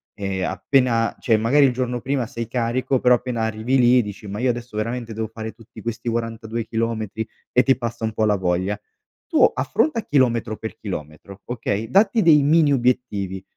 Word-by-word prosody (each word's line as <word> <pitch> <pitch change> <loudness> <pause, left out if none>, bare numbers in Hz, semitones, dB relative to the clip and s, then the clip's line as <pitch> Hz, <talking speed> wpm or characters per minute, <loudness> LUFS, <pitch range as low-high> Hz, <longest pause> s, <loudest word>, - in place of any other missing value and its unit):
e 95 -2 -3
appena 115 +5 +1
cioè, 115 -3 +2
magari 130 +7 +4
il 135 - +3
giorno 125 0 -2
prima 130 -1 -1
sei 115 -1 -5
carico 125 +2 0
però 125 0 +5
appena 120 -1 -3
arrivi 110 +4 0
lì 125 0 +5
dici: 105 0 -8
"Ma 100 +1 -5
io 125 +1 +1
adesso 120 -2 -7
veramente 115 +1 -3
devo 110 +1 -3
fare 110 0 -7
tutti 115 0 -14
questi 115 0 -5
42 115 0 -3
chilometri?" 110 -1 -3 0.2
E 125 - +4
ti 135 - +4
passa 115 -2 -5
un 110 -1 -1
po' 110 - +1
la 105 -1 +3
voglia. 95 +2 -1 0.5
Tu - - +3
affronta 225 - 0
a 220 - -6
chilometro 120 -5 +1
per 110 - -6
chilometro, 95 +1 -8
okay, 115 -2 -3
datti 200 - +4
dei 155 -6 +6
mini 150 0 +4
obiettivi. 120 -7 -1
115 Hz, 185 wpm, -22 LUFS, 110-125 Hz, 0.5 s, dei